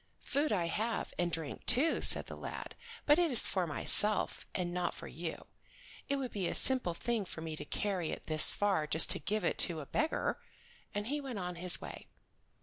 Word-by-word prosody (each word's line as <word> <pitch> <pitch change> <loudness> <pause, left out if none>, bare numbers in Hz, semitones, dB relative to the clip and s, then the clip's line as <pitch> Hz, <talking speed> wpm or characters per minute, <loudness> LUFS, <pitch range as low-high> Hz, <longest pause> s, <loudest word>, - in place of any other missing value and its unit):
"Food 290 +2 -1
I 180 -5 0
have, 220 +7 -3
and 175 -1 -1
drink 160 -3 -5
too," 270 +7 +1
said - - +6
the - - -9
lad, - - -8 0.3
"but 295 +3 +4
it 345 -2 +2
is 245 -5 +6
for 185 -3 -1
myself, 210 +7 +3
and 175 -2 -3
not 180 0 -3
for - - -9
you. 165 0 -7 0.6
It 280 - 0
would 265 -3 -5
be 190 -4 -3
a - - -4
simple 250 -10 +1
thing 235 +2 -2
for 170 -4 -9
me 160 -1 -6
to 150 - -9
carry 190 -1 -3
it - - -7
this 155 -1 +2
far 195 -7 0
just 160 +2 +8
to - - 0
give 215 +1 -3
it - - -2
to 170 -4 +5
a 145 - -8
beggar"; 310 - -2 0.6
and 205 0 -3
he 290 +5 -3
went 260 -5 -7
on 180 -2 -5
his 180 0 +1
way. - - -10
195 Hz, 210 wpm, -32 LUFS, 170-240 Hz, 0.6 s, just